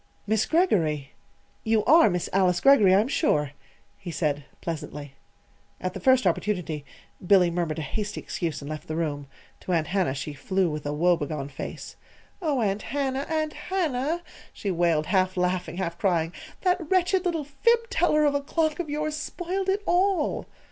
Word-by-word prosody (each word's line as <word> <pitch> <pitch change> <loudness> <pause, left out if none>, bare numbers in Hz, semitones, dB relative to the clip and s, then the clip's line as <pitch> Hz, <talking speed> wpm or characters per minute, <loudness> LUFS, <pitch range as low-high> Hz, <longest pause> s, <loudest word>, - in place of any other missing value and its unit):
"Miss 215 +1 +1
Greggory! 160 - +1 0.5
you 220 -1 +2
are 320 -2 +7
Miss 180 -2 -1
Alice 185 -2 +3
Greggory, 230 -8 +6
I 200 - +5
am 225 - -2
sure," 150 - +1 0.5
he 180 - -7
said 150 -3 -1
pleasantly. 150 -3 -6 0.7
At 185 - -3
the - - -6
first 260 -1 +4
opportunity 175 -8 -1 0.4
Billy 180 -2 +5
murmured 170 -3 -2
a 160 - -3
hasty 205 +8 -4
excuse 165 -5 -4
and 140 - -7
left 155 - -7
the 155 - -3
room. 145 -4 -2 0.3
To 185 - -3
Aunt 165 -2 +2
Hannah 185 -8 0
she 145 +2 -5
flew 185 +4 0
with 150 -1 -5
a - - -1
woebegone 150 -3 0
face. 135 - -7 0.4
"Oh, 295 -7 0
Aunt 200 -1 0
Hannah, 275 -1 -2
Aunt 310 -1 -1
Hannah," 330 -3 -1 0.3
she 200 - -3
wailed, 170 -3 +2
half 185 0 +1
laughing, 180 -1 -1
half 170 -3 -3
crying; 170 -4 +1 0.3
"that 360 -4 0
wretched 370 0 +2
little 335 -4 -1
fib 460 +12 +1
teller 305 -2 +3
of 290 - +3
a 285 - 0
clock 315 +2 0
of 340 -4 -3
yours 305 +1 -2
spoiled 360 +5 -3
it 400 +2 0
all!" 360 -2 +1
195 Hz, 170 wpm, -26 LUFS, -, 0.7 s, are